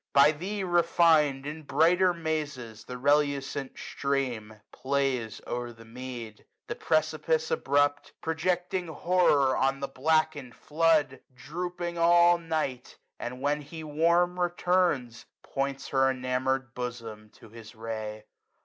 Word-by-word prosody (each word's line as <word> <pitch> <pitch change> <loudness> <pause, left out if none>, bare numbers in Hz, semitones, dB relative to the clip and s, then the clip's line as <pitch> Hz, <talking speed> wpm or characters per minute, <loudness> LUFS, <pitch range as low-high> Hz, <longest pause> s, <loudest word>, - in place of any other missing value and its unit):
By 140 +2 +7
thee 190 +6 -4
refin'd. 165 -5 +3
In 155 +2 -6
brighter 170 +5 +3
mazes 150 -9 -4
the 125 - -7
relucent 140 0 0
stream 125 -6 -3
Plays 130 -5 -1
o'er 120 0 -4
the 115 0 -15
mead. 120 -2 -8 0.2
The - - -4
precipice 160 0 0
abrupt, 145 +1 +1
Projecting 180 +2 -1
horror 160 -5 +2
on 135 +1 +1
the 140 - -3
blackened 150 -3 0
flood. 155 -4 +1
SUMMER - - -36
Drooping 175 +4 -5
all 175 +1 +5
night; 155 -7 -3 0.2
and, 125 +2 -6
when 145 +1 +1
he 160 +3 -9
warm 170 +4 +2
returns, 175 -9 0 0.2
Points 135 0 -3
her 135 -1 +3
enamour'd 130 0 -1
bosom 115 -4 -6
to 115 - -16
his 115 0 -12
ray. 110 -1 -6
145 Hz, 120 wpm, -28 LUFS, 125-165 Hz, 0.2 s, By